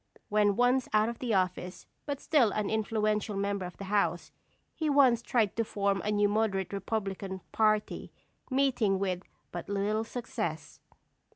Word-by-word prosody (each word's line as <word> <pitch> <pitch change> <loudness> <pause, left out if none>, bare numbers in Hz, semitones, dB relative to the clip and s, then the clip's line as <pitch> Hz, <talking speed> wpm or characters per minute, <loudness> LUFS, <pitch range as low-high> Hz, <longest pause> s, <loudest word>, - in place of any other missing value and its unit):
When 205 -1 +3
once 245 +2 +2
out 215 +1 +4
of 235 - -7
office, 185 -2 -1 0.2
but 285 -1 -2
still 285 -8 +3
an 210 -1 -1
influential 215 -1 0
member 200 -2 -1
of 175 - -12
the - - -7
House, 190 -4 0 0.4
he 315 -2 -1
once 265 -5 +5
tried 230 -4 +1
to 230 - +2
form 200 -2 0
a 210 - -1
new 205 0 +3
Moderate 205 -3 0
Republican 195 -1 -3
party, 215 -1 +1 0.4
meeting 255 -7 +2
with 185 -2 -1 0.3
but 175 +2 -6
little 205 +2 0
success. 225 -9 -5
210 Hz, 150 wpm, -30 LUFS, 195-225 Hz, 0.4 s, once